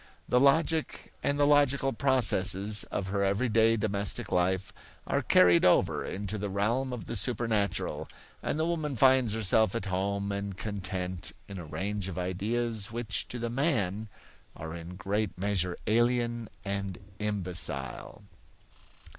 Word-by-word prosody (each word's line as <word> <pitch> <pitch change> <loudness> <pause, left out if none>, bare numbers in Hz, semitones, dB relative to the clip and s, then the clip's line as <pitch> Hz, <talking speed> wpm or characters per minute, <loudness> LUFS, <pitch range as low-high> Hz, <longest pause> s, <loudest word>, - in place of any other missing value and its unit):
The 125 - +3
logic, 160 +3 +2
and 140 - +1
the 145 - +4
logical 140 -2 +3
processes, 105 -6 +3
of 95 0 -4
her 100 0 0
everyday 115 +2 +3
domestic 100 -1 -2
life 95 +1 0 0.3
are - - 0
carried 90 -1 +5
over 85 -3 +3
into 100 +2 -4
the 100 0 -3
realm 115 +7 0
of 125 -3 -5
the 115 - -4
supernatural, 110 -2 -1 0.3
and - - -2
the 160 - +1
woman 155 -4 -1
finds 130 -2 +4
herself 110 0 +2
at 115 - -2
home 100 +1 -1
and 100 -1 -4
content 95 -3 -3
in 100 -2 -7
a 85 - -7
range 95 +6 -3
of 95 - -6
ideas 105 +4 -2
which 115 -3 -2
to 125 - -5
the 120 -1 -3
man 110 - 0 0.5
are 80 0 -7
in 85 +1 -8
great 100 +2 -2
measure 90 -2 -1
alien 120 0 +1 0.2
and 100 -2 -3 0.2
imbecile. 90 - -4
105 Hz, 140 wpm, -29 LUFS, 95-120 Hz, 0.5 s, carried